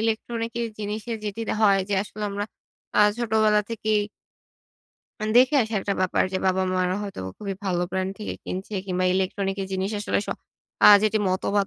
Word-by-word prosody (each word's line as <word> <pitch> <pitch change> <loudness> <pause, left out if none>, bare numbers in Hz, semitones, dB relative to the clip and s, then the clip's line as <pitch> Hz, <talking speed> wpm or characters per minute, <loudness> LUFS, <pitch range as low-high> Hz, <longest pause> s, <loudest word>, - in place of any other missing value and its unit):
electronic 230 +1 -2
এর 230 - -1
জিনিসের 215 +2 -4
যেটি 210 +2 -4
দা - - 0
হয় 195 -1 +5
যে 205 - +1
আসলে 210 +1 -9
আমরা 205 +1 -2 0.5
আ - - +4 0.2
ছোটবেলা 215 -2 +3
থেকেই 215 -2 +1 1.2
আন 215 - -1
দেখে 255 +4 +6
আসি 220 +1 -6
একটা 200 - -1
ব্যাপার 185 -1 +2
যে 185 - 0
বাবা-মারা 185 -1 +1
হয়তো 200 - -6 0.2
খুবই 200 -2 -4
ভালো 180 -2 0
ব্র্যান্ড 190 0 -1
থেকে 210 - -4
কিনছে 190 +3 -5
কিংবা 185 0 0
ইলেকট্রনিকের 195 +1 -1
জিনিস 190 +2 -1
আসলে 210 - 0
স - - -15 0.6
আ - - +11
যেটি 215 0 +2
মতবাদ 195 +2 +1
205 Hz, 170 wpm, -25 LUFS, 190-215 Hz, 1.2 s, আ